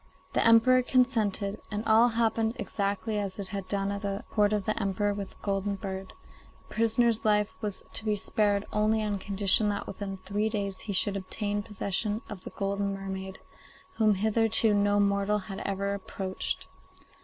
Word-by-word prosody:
The -, -, +3 dB
Emperor 230 Hz, +3 st, +6 dB
consented, 220 Hz, -6 st, +1 dB
and 210 Hz, +1 st, -3 dB
all 225 Hz, +2 st, +6 dB
happened 225 Hz, -1 st, +1 dB
exactly 205 Hz, +1 st, -2 dB
as 195 Hz, -2 st, -3 dB
it 200 Hz, -2 st, -5 dB
had 195 Hz, -2 st, -5 dB
done 195 Hz, +1 st, -1 dB
at 200 Hz, 0 st, -4 dB
the 200 Hz, 0 st, -3 dB
court 210 Hz, -1 st, +3 dB
of 210 Hz, -2 st, 0 dB
the 215 Hz, -, 0 dB
Emperor 205 Hz, +1 st, 0 dB
with 200 Hz, -1 st, -5 dB
the -, -, -19 dB
golden 200 Hz, 0 st, -1 dB
bird; 190 Hz, -1 st, -6 dB, 0.5 s
the -, -, -13 dB
prisoner's 230 Hz, 0 st, +2 dB
life 210 Hz, -1 st, +2 dB
was 205 Hz, -3 st, -3 dB
to -, -, -1 dB
be 210 Hz, -1 st, +2 dB
spared 205 Hz, 0 st, +1 dB
only 215 Hz, +1 st, +2 dB
on 205 Hz, -2 st, -1 dB
condition 200 Hz, +2 st, +3 dB
that 205 Hz, 0 st, -2 dB
within 195 Hz, 0 st, -6 dB
three 205 Hz, +3 st, -1 dB
days 200 Hz, -3 st, -3 dB
he 205 Hz, -, -5 dB
should 190 Hz, +2 st, +1 dB
obtain 205 Hz, +2 st, -2 dB
possession 210 Hz, +1 st, -2 dB
of 195 Hz, -3 st, -8 dB
the -, -, -5 dB
golden 200 Hz, 0 st, -2 dB
mermaid, 190 Hz, 0 st, -6 dB, 0.6 s
whom 215 Hz, -2 st, +4 dB
hitherto 220 Hz, +2 st, +3 dB
no 205 Hz, 0 st, +3 dB
mortal 200 Hz, +1 st, +2 dB
had 195 Hz, -1 st, -6 dB
ever 200 Hz, 0 st, -2 dB
approached. 190 Hz, -1 st, -4 dB
205 Hz, 175 wpm, -28 LUFS, 195-215 Hz, 0.6 s, Emperor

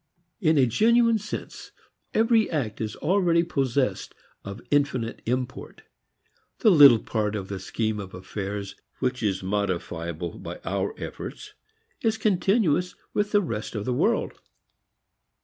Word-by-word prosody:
In 160 Hz, -6 st, +3 dB
a 135 Hz, -, +6 dB
genuine 230 Hz, -, +3 dB
sense 210 Hz, +2 st, -7 dB, 0.4 s
every 225 Hz, 0 st, +3 dB
act 120 Hz, -10 st, -2 dB
is 110 Hz, -1 st, -3 dB
already 170 Hz, 0 st, +2 dB
possessed 135 Hz, -5 st, -1 dB, 0.3 s
of 100 Hz, 0 st, -7 dB
infinite 140 Hz, -5 st, 0 dB
import. 125 Hz, +1 st, -3 dB, 0.8 s
The 220 Hz, -, +6 dB
little 145 Hz, -8 st, +9 dB
part 110 Hz, -1 st, -2 dB
of 95 Hz, -2 st, -5 dB
the 100 Hz, -1 st, -4 dB
scheme 110 Hz, +3 st, -2 dB
of 95 Hz, -2 st, -8 dB
affairs 100 Hz, +1 st, -5 dB, 0.2 s
which 130 Hz, -1 st, -1 dB
is 95 Hz, -4 st, -1 dB
modifiable 85 Hz, -4 st, -3 dB
by -, -, -7 dB
our -, -, -2 dB
efforts -, -, -7 dB, 0.5 s
is 225 Hz, -1 st, +1 dB
continuous 190 Hz, -4 st, +1 dB, 0.2 s
with 205 Hz, 0 st, 0 dB
the 205 Hz, -, +4 dB
rest 115 Hz, -8 st, -4 dB
of 105 Hz, -1 st, -3 dB
the 125 Hz, -, 0 dB
world. -, -, 0 dB
125 Hz, 130 wpm, -25 LUFS, -, 0.8 s, little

